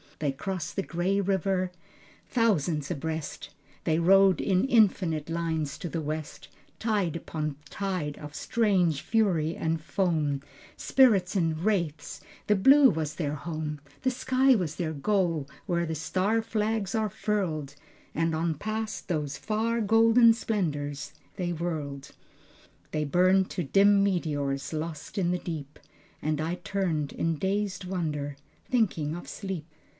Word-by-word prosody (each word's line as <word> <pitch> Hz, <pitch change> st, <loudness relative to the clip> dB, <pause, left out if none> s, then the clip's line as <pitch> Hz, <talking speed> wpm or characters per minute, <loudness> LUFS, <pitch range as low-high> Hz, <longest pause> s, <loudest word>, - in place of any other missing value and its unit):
They 145 Hz, -3 st, 0 dB
crossed 180 Hz, +4 st, -4 dB
the 195 Hz, -, 0 dB
gray 185 Hz, +4 st, 0 dB
river, 190 Hz, -1 st, 0 dB, 0.6 s
thousands 170 Hz, -, +1 dB
abreast, 160 Hz, -1 st, -4 dB, 0.3 s
They 160 Hz, -, +2 dB
rode 190 Hz, +2 st, +5 dB
in 190 Hz, +1 st, +2 dB
infinite 185 Hz, -, +2 dB
lines 160 Hz, -3 st, -2 dB
to 175 Hz, -, -4 dB
the 165 Hz, +1 st, -3 dB
west, 155 Hz, 0 st, -5 dB, 0.3 s
Tide 205 Hz, -8 st, 0 dB
upon 155 Hz, -3 st, -3 dB
tide 185 Hz, -7 st, -3 dB
of 150 Hz, 0 st, -9 dB
strange 185 Hz, -10 st, +1 dB
fury 180 Hz, -8 st, +1 dB
and 160 Hz, 0 st, -1 dB
foam, 155 Hz, -5 st, 0 dB, 0.3 s
Spirits 210 Hz, -8 st, +3 dB
and 165 Hz, -4 st, +1 dB
wraiths, 170 Hz, -8 st, -1 dB, 0.3 s
the 210 Hz, -, +4 dB
blue 270 Hz, +7 st, +7 dB
was 155 Hz, -4 st, -2 dB
their 150 Hz, -4 st, -2 dB
home, 155 Hz, -1 st, -4 dB, 0.2 s
The 260 Hz, -, +1 dB
sky 260 Hz, +1 st, +3 dB
was 170 Hz, -7 st, -1 dB
their 165 Hz, -3 st, -2 dB
goal 165 Hz, -2 st, 0 dB, 0.2 s
where 170 Hz, -2 st, +1 dB
the 160 Hz, -1 st, -3 dB
star 190 Hz, +8 st, 0 dB
flags 220 Hz, -2 st, -1 dB
are 220 Hz, -1 st, +1 dB
furled, 165 Hz, -10 st, -2 dB, 0.4 s
And 165 Hz, +1 st, +1 dB
on 160 Hz, 0 st, 0 dB
past 215 Hz, +5 st, -4 dB
those 150 Hz, -6 st, -2 dB
far 225 Hz, +6 st, -1 dB
golden 225 Hz, +2 st, +6 dB
splendors 150 Hz, -, -2 dB, 0.2 s
they 180 Hz, -3 st, -2 dB
whirled. 150 Hz, -5 st, -4 dB, 0.8 s
They 155 Hz, -1 st, -1 dB
burned 185 Hz, +5 st, +3 dB
to 180 Hz, -, -2 dB
dim 200 Hz, +6 st, +5 dB
meteors, 145 Hz, -7 st, -1 dB
lost 155 Hz, +2 st, -5 dB
in 175 Hz, -2 st, +1 dB
the 180 Hz, 0 st, 0 dB
deep. 150 Hz, -5 st, -6 dB, 0.4 s
And 155 Hz, 0 st, 0 dB
I 165 Hz, +3 st, -1 dB
turned 175 Hz, -5 st, -2 dB
in 165 Hz, -1 st, -1 dB
dazed 195 Hz, +1 st, -1 dB
wonder, 150 Hz, -6 st, -3 dB, 0.3 s
thinking 175 Hz, -11 st, 0 dB
of 175 Hz, -, -8 dB
sleep. 190 Hz, -6 st, -5 dB
175 Hz, 140 wpm, -28 LUFS, 155-200 Hz, 0.8 s, blue